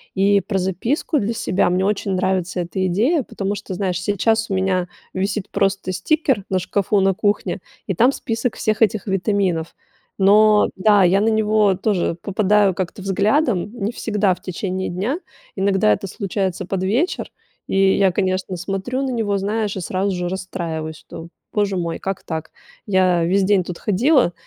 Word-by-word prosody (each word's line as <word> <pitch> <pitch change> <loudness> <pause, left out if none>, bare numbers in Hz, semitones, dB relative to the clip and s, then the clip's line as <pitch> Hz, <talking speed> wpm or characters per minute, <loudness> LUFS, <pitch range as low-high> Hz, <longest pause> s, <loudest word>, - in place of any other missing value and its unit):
И 200 +1 +3
про 195 -1 -2
записку 225 - -1
для 220 +1 -1
себя- 195 -5 +1
мне 185 +2 +1
очень 200 -1 -1
нравится 185 -1 0
эта 175 +2 -3
идея, 240 - +2
потому 200 -2 -3
что, 200 - -6
знаешь, 180 -2 -2
сейчас 220 +2 +1
у 195 - 0
меня 185 -1 0 0.3
висит 195 +1 -2
просто 195 -1 0
стикер 265 - 0
на 190 - +1
шкафу, 200 +2 0
на 195 0 +3
кухне, 205 +2 -1 0.3
и 195 - 0
там 240 +9 +4
список 225 -1 -2
всех 215 0 -1
этих 215 -2 +2
витаминов. 190 -4 0 0.4
Но, 210 +2 +5
да, 205 0 +5
я 185 +2 +4
на 215 - +2
него 215 -2 +3
тоже 190 -3 0
попадаю 205 0 +2
как-то 185 +2 -4
взглядом, 205 - +1
не 225 -3 -3
всегда 210 -5 0
в - - -22
течение 185 +1 -3
дня, 210 - -2 0.4
иногда 195 - +2
это 195 - -4
случается 190 -2 -3
под 190 0 -2
вечер, 250 - 0 0.4
и 195 0 +3
я, 195 -2 +4
конечно, 185 0 -1
смотрю 195 +8 -3
на 270 - -1
него, 215 -4 0
знаешь, 210 +1 -1
и - - -3
сразу 190 +3 -1
же 180 0 -2
расстраиваюсь, 165 -4 -4
что: 165 +2 -10 0.2
"Боже 200 -2 0
мой, 170 -2 -2
как 195 -1 -4
так, 160 -2 -5 0.4
я 185 -3 +3
весь 190 +3 +2
день 195 -1 +3
тут 175 0 -7
ходила 235 - +3
195 Hz, 170 wpm, -20 LUFS, 185-210 Hz, 0.4 s, Но